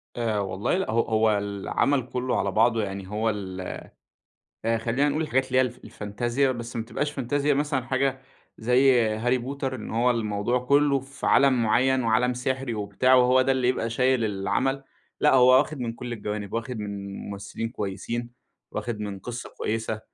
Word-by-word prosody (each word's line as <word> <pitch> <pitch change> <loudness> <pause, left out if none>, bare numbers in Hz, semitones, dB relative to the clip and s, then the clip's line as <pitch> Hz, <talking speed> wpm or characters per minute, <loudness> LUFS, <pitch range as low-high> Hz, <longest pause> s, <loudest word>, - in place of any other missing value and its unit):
آآ 115 -3 0
والله 95 - -1
لأ. 190 - -2
هو 115 +1 +3
هو 110 -2 +2
العمل 100 +7 0
كُلّه 125 0 -1
على 100 - 0
بعضه 115 +2 +3
يعني 95 -1 -5
هو 105 +3 -1
ال 95 -3 -4 1.0
آآ، 115 0 +1
خلّينا 125 +6 +1
نقول 150 +2 0
الحاجات 130 -4 +1
اللي 130 0 +2
هي - - +6
الف 125 -3 -3
الفانتازيا، 120 +6 -1
بس 120 -1 -7
ما 115 - -2
تبقاش 145 +5 -2
فانتازيا 145 +2 0
مثلًا 140 -2 0
حاجة 130 +1 0 0.4
زي 125 +2 +4
هاري 120 +4 +1
بوتر 135 +1 -4
إن 120 - -7
هو 120 +3 +2
الموضوع 110 +1 0
كُلّه 140 0 +4
في 135 +1 -7
عالم 135 -3 +4
معيّن 130 +4 +3
وعالم 120 +2 +2
سِحري 130 0 -2
وبتاع 105 +5 +2
وهو 125 0 +5
ده 135 - +2
اللي 130 -2 +1
يبقى 115 -2 0
شايل 125 0 +2
العمل، 130 +7 -1 0.4
لأ - - +5
هو 125 -1 +6
واخِد 150 +2 -1
من 115 -2 -2
كل 120 +1 -7
الجوانب، 105 -2 -5
واخِد 115 +1 -3
من 100 -1 -5
ممثلين 100 +3 -5
كويسين، 115 +2 -4 0.4
واخِد 115 -3 -4
من 100 -2 -4
قِصّة 120 +4 -7
كويسة، 110 0 -2
120 Hz, 175 wpm, -26 LUFS, 110-130 Hz, 1.0 s, هي